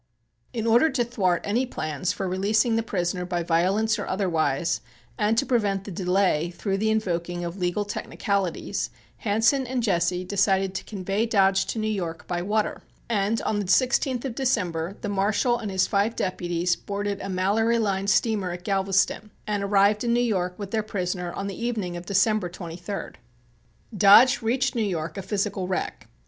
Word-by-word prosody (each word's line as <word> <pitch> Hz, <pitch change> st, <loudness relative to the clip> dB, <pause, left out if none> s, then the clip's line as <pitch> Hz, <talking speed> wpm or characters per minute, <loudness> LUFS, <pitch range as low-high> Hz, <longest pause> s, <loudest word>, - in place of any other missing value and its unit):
In 225 Hz, -2 st, -3 dB
order 235 Hz, +7 st, +5 dB
to 245 Hz, -, +1 dB
thwart 190 Hz, -7 st, 0 dB
any 225 Hz, +5 st, +1 dB
plans 155 Hz, -, -2 dB
for 190 Hz, -, -3 dB
releasing 210 Hz, +5 st, +2 dB
the 225 Hz, -, +2 dB
prisoner 180 Hz, -4 st, -2 dB
by 175 Hz, -1 st, -2 dB
violence 195 Hz, +7 st, +2 dB
or 205 Hz, -, -4 dB
otherwise, 165 Hz, -, 0 dB, 0.3 s
and 215 Hz, -, +1 dB
to 275 Hz, -, +3 dB
prevent 205 Hz, -7 st, +1 dB
delay 180 Hz, -3 st, +1 dB
through 195 Hz, +2 st, -2 dB
the 220 Hz, +1 st, +1 dB
invoking 175 Hz, -5 st, -1 dB
of 170 Hz, +2 st, -5 dB
legal 180 Hz, +3 st, 0 dB
technicalities, 200 Hz, -2 st, -2 dB, 0.3 s
Hansen 230 Hz, +5 st, +2 dB
and 250 Hz, -1 st, -1 dB
Jesse 180 Hz, -3 st, +1 dB
decided 195 Hz, 0 st, +1 dB
to -, -, -4 dB
convey 200 Hz, +2 st, -2 dB
Dodge 195 Hz, -3 st, +3 dB
to -, -, -3 dB
New 215 Hz, 0 st, -1 dB
York 175 Hz, -6 st, -3 dB
by 175 Hz, -1 st, -2 dB
water, 210 Hz, +3 st, -1 dB, 0.3 s
and 210 Hz, +1 st, +1 dB
on 210 Hz, -, 0 dB
the 205 Hz, -, -2 dB
16th 255 Hz, +3 st, +2 dB
of 260 Hz, -, -3 dB
December, 195 Hz, -9 st, -1 dB
the -, -, -3 dB
Marshal 205 Hz, +5 st, +1 dB
and 215 Hz, -, -4 dB
his 190 Hz, -1 st, +2 dB
five 205 Hz, +3 st, +1 dB
deputies 175 Hz, -1 st, -1 dB
boarded 200 Hz, +1 st, -4 dB
a -, -, -5 dB
Mallory 205 Hz, +5 st, +2 dB
Line 200 Hz, -3 st, 0 dB
steamer 200 Hz, -1 st, +2 dB
at 175 Hz, 0 st, -7 dB
Galveston 195 Hz, +2 st, +1 dB, 0.2 s
and 210 Hz, -1 st, -1 dB
arrived 200 Hz, +2 st, +3 dB
in 235 Hz, -1 st, +1 dB
New 240 Hz, -, +3 dB
York 185 Hz, -7 st, 0 dB
with 200 Hz, -2 st, -6 dB
their 220 Hz, -, +1 dB
prisoner 180 Hz, -4 st, -3 dB
on 195 Hz, -, -4 dB
the 200 Hz, +3 st, -5 dB
evening 210 Hz, -7 st, -2 dB
of 175 Hz, 0 st, -8 dB
December 200 Hz, -1 st, +2 dB
23d. 175 Hz, +2 st, -7 dB, 0.8 s
Dodge 220 Hz, +8 st, +7 dB
reached 250 Hz, +4 st, +1 dB
New 235 Hz, -, -1 dB
York 165 Hz, -6 st, -2 dB
a 195 Hz, -, -4 dB
physical 195 Hz, -1 st, -2 dB
wreck. 185 Hz, -, -3 dB
200 Hz, 175 wpm, -25 LUFS, 180-220 Hz, 0.8 s, Dodge